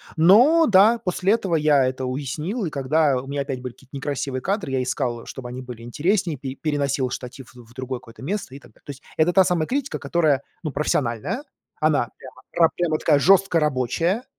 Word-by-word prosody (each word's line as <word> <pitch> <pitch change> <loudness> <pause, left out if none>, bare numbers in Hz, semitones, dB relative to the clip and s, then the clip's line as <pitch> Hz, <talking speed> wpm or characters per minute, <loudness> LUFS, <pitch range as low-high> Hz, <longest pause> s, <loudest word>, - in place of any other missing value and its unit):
Но, 240 - +6
да, 210 +3 +6
после 190 -1 0
этого 195 -7 0
я 150 -3 +3
это 130 0 -2
уяснил, 150 - -3
и - - -2
когда 140 -1 +1
у 135 - -12
меня 140 +1 -2
опять 135 -2 -4
были 125 -1 -6
какие-то 135 +3 -16
некрасивые 140 -1 -3
кадры, 190 - -2
я 130 -1 0
искал, 125 -2 -2
чтобы 125 -2 -8
они 125 +1 -6
были 125 -2 -9
интереснее, 165 - -1
пе 130 0 -6
переносил 140 -3 -1
штатив 125 +1 -8
в 120 -2 -14
в - - -18
другое 130 0 -5
какое-то 115 +2 -14
место 175 -4 -4
и - - -9
так - - -18
далее. - - -29
То - - -6
есть 140 0 -13
это 160 +3 +3
та 190 - +6
самая 175 -3 0
критика, 275 +1 -2
которая, 155 -6 +1 0.2
ну, 155 - -3
профессиональная, 140 - -1 0.4
она 155 -6 +2
прямо 130 -1 -13 0.2
ра - - +3
прямо 170 -3 0
такая 150 -2 +3
жёстко 190 +3 +4
рабочая 150 - 0
145 Hz, 205 wpm, -23 LUFS, 130-175 Hz, 0.4 s, Но